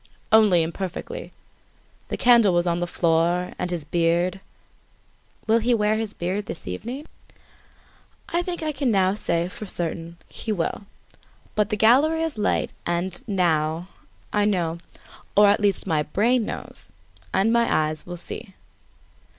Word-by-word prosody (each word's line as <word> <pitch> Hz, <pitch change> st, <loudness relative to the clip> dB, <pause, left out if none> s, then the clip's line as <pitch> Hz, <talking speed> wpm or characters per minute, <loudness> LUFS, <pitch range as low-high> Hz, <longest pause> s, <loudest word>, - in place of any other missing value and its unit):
"Only 210 Hz, -6 st, +6 dB
imperfectly. 190 Hz, -, -5 dB, 0.8 s
The -, -, -3 dB
candle 235 Hz, -7 st, +5 dB
was 175 Hz, 0 st, +2 dB
on 170 Hz, -1 st, 0 dB
the 175 Hz, -, -1 dB
floor; 170 Hz, +1 st, +1 dB
and, 180 Hz, -, -2 dB
his 170 Hz, -4 st, -3 dB
beard 170 Hz, +3 st, +1 dB, 0.5 s
" -, -, -36 dB
"Will 225 Hz, +1 st, +4 dB
he 240 Hz, +2 st, +2 dB
wear 210 Hz, -1 st, +2 dB
his 220 Hz, -1 st, -4 dB
beard 190 Hz, +4 st, -3 dB
this -, -, -7 dB
evening?" 240 Hz, -, -5 dB, 1.2 s
"I 345 Hz, -, 0 dB
think 350 Hz, -2 st, -4 dB
I 310 Hz, -, 0 dB
can 270 Hz, -3 st, 0 dB, 0.2 s
say 170 Hz, -4 st, 0 dB
for 205 Hz, +3 st, -8 dB
certain 170 Hz, -1 st, -3 dB
that -, -, -22 dB
he 220 Hz, -, -3 dB
will. 200 Hz, +1 st, -2 dB, 0.7 s
But 210 Hz, 0 st, +1 dB
the 210 Hz, -, -1 dB
gallery 285 Hz, +9 st, +4 dB
is 325 Hz, -2 st, -2 dB
light 210 Hz, -, 0 dB
and, 175 Hz, +1 st, -2 dB
now, 170 Hz, -3 st, 0 dB, 0.4 s
I 210 Hz, -, +3 dB
know 170 Hz, -5 st, 0 dB, 0.6 s
or 205 Hz, 0 st, +8 dB
at 205 Hz, -, +3 dB
least, 205 Hz, -1 st, +1 dB
my 160 Hz, -5 st, +1 dB
brain 220 Hz, +9 st, +1 dB
knows -, -, -7 dB, 0.4 s
and 200 Hz, +4 st, +2 dB
my 235 Hz, 0 st, +3 dB
eyes 155 Hz, 0 st, 0 dB
will 175 Hz, 0 st, -7 dB
see." 190 Hz, +3 st, -8 dB
190 Hz, 150 wpm, -24 LUFS, 170-225 Hz, 1.2 s, or